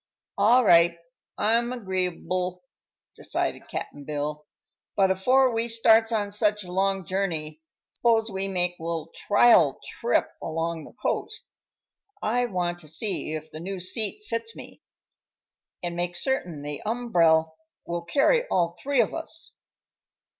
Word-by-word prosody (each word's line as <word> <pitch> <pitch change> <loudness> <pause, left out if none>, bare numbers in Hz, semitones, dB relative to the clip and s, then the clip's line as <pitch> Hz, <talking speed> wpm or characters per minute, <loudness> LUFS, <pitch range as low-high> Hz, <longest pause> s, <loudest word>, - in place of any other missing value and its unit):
"All 235 +5 +5
right; 170 -2 +6 0.4
I'm 230 +3 +2
agree'ble," 185 -4 -2 0.5
decided - - -3
Cap'n 145 - -6
Bill. 150 +1 -4 0.5
"But 190 -1 +4
afore 250 +7 +3
we 230 +1 0
starts 225 0 +4
on 205 -3 0
such 210 0 +1
a 180 - -10
long 195 0 0
journey, 160 -5 -2 0.4
s'pose 225 -2 +3
we 190 0 -1
make 180 -2 0
a - - -10
little 165 -1 -3
trial 230 +3 +4 0.2
trip 485 - +2
along 165 -1 -3
the - - -14
coast. 430 - -3 0.7
I 245 - +1
want 175 -4 -2
to 160 - -7
see 160 0 -3
if 155 0 -7
the 155 - -8
new 190 +3 -5
seat 215 - -2
fits 230 0 -3
me, - - -11 1.0
an' 175 -1 -3
make 175 0 -2
certain 175 - -1
the 145 -1 -5
umbrel 170 -9 +2 0.3
will 170 0 -3
carry 290 - +2
all 170 -1 +1
three 280 -2 +3
of 225 - -1
us." 325 0 -7
190 Hz, 140 wpm, -26 LUFS, 170-225 Hz, 1.0 s, right